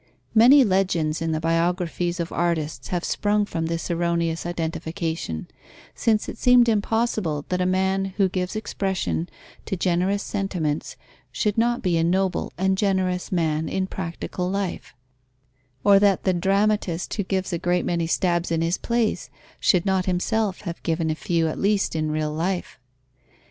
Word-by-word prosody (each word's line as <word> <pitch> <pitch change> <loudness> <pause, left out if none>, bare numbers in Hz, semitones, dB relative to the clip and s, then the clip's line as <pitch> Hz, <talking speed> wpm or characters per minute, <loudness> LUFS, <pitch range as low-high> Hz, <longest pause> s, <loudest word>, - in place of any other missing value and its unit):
Many 250 +5 +7
legends 180 -7 +1
in 165 0 -1
the 155 - 0
biographies 170 +1 0
of 170 0 -3
artists 170 -3 -1
have 175 -1 -2
sprung 210 0 +1
from 165 -5 -3
this 165 +1 -3
erroneous 170 -1 0
identification, 165 - -3 0.5
since 220 -2 +1
it - - -7
seemed 250 -1 +6
impossible 215 -8 0
that 180 0 0
a 180 - +2
man 190 +1 +1
who 195 -2 +4
gives 185 +1 -3
expression 190 - -2 0.4
to 195 - -3
generous 185 +3 +1
sentiments 165 -10 -2 0.4
should 205 +11 0
not 240 +2 +1
be 175 -2 +2
a - - +2
noble 185 +2 0
and 190 +1 +1
generous 190 -3 0
man 160 -3 0
in 190 - -1
practical 180 0 -4
life; 195 -1 -3 0.9
or 200 -1 +6
that 200 -2 +3
the 190 - +2
dramatist 195 -1 0
who 210 - -1
gives 190 0 -2
a 170 - -1
great 175 +1 0
many 170 -1 0
stabs 175 0 +1
in 165 0 +1
his 170 +2 0
plays, 235 -2 -1 0.3
should 180 -2 +3
not 190 -1 +1
himself 195 +2 0
have 170 -3 -6
given 165 -1 0
a - - +1
few 165 +1 0
at 155 - -3
least 200 -3 +1
in 155 -1 0
real 155 0 -1
life. 175 +1 -3
180 Hz, 160 wpm, -24 LUFS, 165-195 Hz, 0.9 s, Many